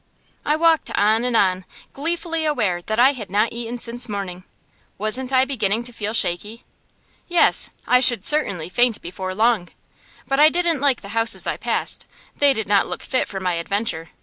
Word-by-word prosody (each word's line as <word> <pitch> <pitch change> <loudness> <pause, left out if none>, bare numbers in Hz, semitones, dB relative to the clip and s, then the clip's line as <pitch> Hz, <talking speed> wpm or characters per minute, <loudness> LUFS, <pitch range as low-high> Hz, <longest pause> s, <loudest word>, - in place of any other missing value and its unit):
I 300 - +1
walked 325 0 +2
on 220 +3 +2
and 245 -2 +1
on, 185 -2 +1 0.3
gleefully 330 +2 -3
aware 205 - -1
that 215 +5 -4
I 255 +3 +5
had 225 -8 -8
not 210 +4 0
eaten 235 +1 -5
since 240 0 0
morning. 185 -3 -6 0.5
Wasn't 250 +6 -1
I 260 0 +3
beginning 225 -4 -1
to 245 0 -9
feel 215 -1 -4
shaky? 210 +5 -1 0.6
Yes; 350 -1 +5 0.2
I 250 - +4
should 240 -5 +2
certainly 200 - +1
faint 235 +4 +1
before 185 +2 -6
long. 220 -5 +1 0.6
But 275 +1 0
I 305 +1 +7
didn't 340 -4 0
like 280 -3 +2
the 200 - -11
houses 225 +1 +2
I - - -1
passed. - - -3 0.3
They 285 -1 +4
did 220 -5 -2
not 200 -1 +2
look - - -6
fit 255 - -1
for 195 - -6
my 180 -2 -1
adventure. 170 -1 -3
230 Hz, 180 wpm, -21 LUFS, 200-265 Hz, 0.6 s, I